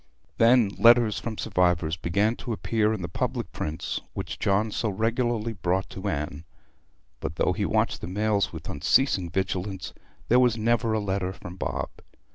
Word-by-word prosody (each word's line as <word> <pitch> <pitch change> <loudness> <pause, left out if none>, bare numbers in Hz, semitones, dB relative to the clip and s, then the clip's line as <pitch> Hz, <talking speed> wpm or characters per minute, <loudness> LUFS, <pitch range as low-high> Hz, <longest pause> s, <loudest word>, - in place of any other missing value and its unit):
Then 115 -2 +5
letters 115 -2 +6
from 110 -2 -5
survivors 90 -5 +1
began 100 +7 +1
to 120 - -4
appear 110 0 +1
in 110 -5 -3
the - - -2
public - - -3
prints 80 +1 -4
which - - -5
John 105 +2 +1
so 110 - -1
regularly 115 +2 0
brought 95 0 -1
to 95 +2 -4
Anne; 75 -1 -3 0.8
but 75 - -4
though - - +2
he - - -1
watched - - 0
the - - -5
mails 105 +2 +1
with 80 -2 -8
unceasing 95 - +2
vigilance 95 +1 -3 0.3
there 125 - +5
was 125 -3 +3
never 115 0 +1
a 110 - +1
letter 95 -2 -1
from 90 -2 -9
Bob. - - -3
100 Hz, 165 wpm, -26 LUFS, 90-115 Hz, 0.8 s, letters